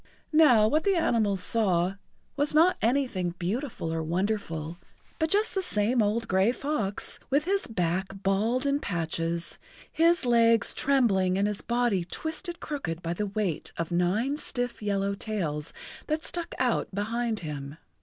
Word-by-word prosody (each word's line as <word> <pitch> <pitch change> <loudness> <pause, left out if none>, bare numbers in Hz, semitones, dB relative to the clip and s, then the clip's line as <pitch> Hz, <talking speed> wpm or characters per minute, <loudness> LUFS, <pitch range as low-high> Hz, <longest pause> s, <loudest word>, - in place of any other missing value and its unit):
Now, 255 -9 +6
what 310 +7 +2
the 395 -1 +2
animals 220 - +1
saw 185 -5 +2 0.4
was 290 +1 0
not 340 +4 +5
anything 225 -8 0
beautiful 190 - -3
or 165 - -1
wonderful, 170 -2 -2 0.4
but 320 0 +1
just 415 +5 +2
the 385 - 0
same 230 - +1
old 220 +2 0
gray 190 +4 +3
fox, 250 -8 -3
with 285 +3 +2
his 390 +2 0
back 185 -3 -1 0.2
bald 220 +7 +1
in 280 0 +2
patches, 170 - -3 0.3
his 335 -2 +3
legs 230 -1 +4
trembling 195 -9 +2
and 200 +1 +2
his 210 -1 -3
body 235 -6 +1
twisted 320 - -5
crooked 175 - -4
by 165 0 -1
the 205 +4 -2
weight 195 -5 -2
of 170 +1 -3
nine 200 +11 +1
stiff 245 -5 -3
yellow 200 -1 0
tails 170 -8 -3 0.4
that 310 +1 -1
stuck 345 -1 -3
out 250 -2 +1
behind 225 +1 -1
him. 145 -2 -6
215 Hz, 150 wpm, -27 LUFS, 180-275 Hz, 0.4 s, Now